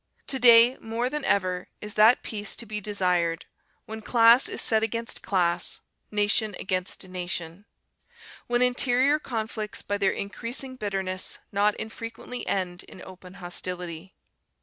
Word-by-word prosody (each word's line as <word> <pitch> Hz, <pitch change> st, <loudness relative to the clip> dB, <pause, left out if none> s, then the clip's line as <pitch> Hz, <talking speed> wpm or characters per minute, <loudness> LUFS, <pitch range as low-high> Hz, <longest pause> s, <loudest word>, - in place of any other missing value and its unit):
To 265 Hz, -, -1 dB
day 235 Hz, +1 st, +7 dB
more 235 Hz, +3 st, -3 dB
than 300 Hz, -1 st, -3 dB
ever 185 Hz, -2 st, 0 dB
is 210 Hz, 0 st, -8 dB
that 220 Hz, +3 st, +5 dB
peace 210 Hz, -3 st, 0 dB
to 235 Hz, -, -6 dB
be 210 Hz, -1 st, -5 dB
desired, 180 Hz, -5 st, 0 dB, 0.4 s
when 220 Hz, 0 st, -7 dB
class 235 Hz, +2 st, +5 dB
is -, -, -2 dB
set 220 Hz, -1 st, +2 dB
against 230 Hz, +1 st, -3 dB
class, 175 Hz, -2 st, +1 dB, 0.3 s
nation 210 Hz, 0 st, +1 dB
against 185 Hz, 0 st, -1 dB
nation; 180 Hz, 0 st, -5 dB, 0.8 s
when 240 Hz, +1 st, +2 dB
interior 250 Hz, +3 st, +3 dB
conflicts 220 Hz, -5 st, -4 dB
by 205 Hz, 0 st, -3 dB
their 195 Hz, -1 st, +3 dB
increasing 240 Hz, +6 st, -3 dB
bitterness 190 Hz, -5 st, -2 dB
not 205 Hz, +1 st, +2 dB
infrequently 230 Hz, +2 st, -7 dB
end 180 Hz, -2 st, -2 dB
in -, -, -13 dB
open 185 Hz, 0 st, -12 dB
hostility. 180 Hz, -1 st, -6 dB
210 Hz, 135 wpm, -26 LUFS, 185-230 Hz, 0.8 s, day